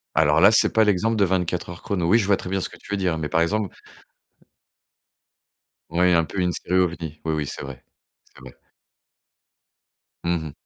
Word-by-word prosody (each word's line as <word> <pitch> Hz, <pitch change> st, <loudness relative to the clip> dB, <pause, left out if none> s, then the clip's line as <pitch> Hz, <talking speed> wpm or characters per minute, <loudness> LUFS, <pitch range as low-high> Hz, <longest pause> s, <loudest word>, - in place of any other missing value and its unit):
Alors 75 Hz, 0 st, +4 dB
là, 100 Hz, +4 st, +7 dB
c'est 110 Hz, -, +4 dB
pas 110 Hz, -, +4 dB
l'exemple 105 Hz, +3 st, +1 dB
de 100 Hz, -, +3 dB
24 90 Hz, -1 st, -1 dB
Heures 85 Hz, -, -10 dB
chrono. 90 Hz, -4 st, -2 dB
Oui, 110 Hz, +6 st, +5 dB
je 105 Hz, -, 0 dB
vois 100 Hz, -1 st, +3 dB
très 90 Hz, -, -7 dB
bien 95 Hz, 0 st, -1 dB
ce -, -, -2 dB
que -, -, -14 dB
tu -, -, -16 dB
veux -, -, +1 dB
dire, 90 Hz, -4 st, -1 dB
mais 75 Hz, -1 st, -3 dB
par 80 Hz, -, +1 dB
exemple 105 Hz, +3 st, -1 dB, 2.2 s
Ouais, 90 Hz, +2 st, +3 dB
un 85 Hz, -1 st, +3 dB
peu 95 Hz, -, -5 dB
une 90 Hz, -1 st, +1 dB
série 90 Hz, +1 st, -1 dB
ovni. 85 Hz, -4 st, -2 dB
Oui, 80 Hz, -1 st, -1 dB
oui, 75 Hz, -2 st, -2 dB
c'est -, -, -6 dB
vrai. 70 Hz, -2 st, -9 dB, 0.4 s
C'est -, -, -21 dB
vrai. 65 Hz, -2 st, -12 dB, 1.7 s
Mmh 85 Hz, 0 st, +1 dB
mh. -, -, -11 dB
90 Hz, 205 wpm, -23 LUFS, 80-95 Hz, 2.2 s, là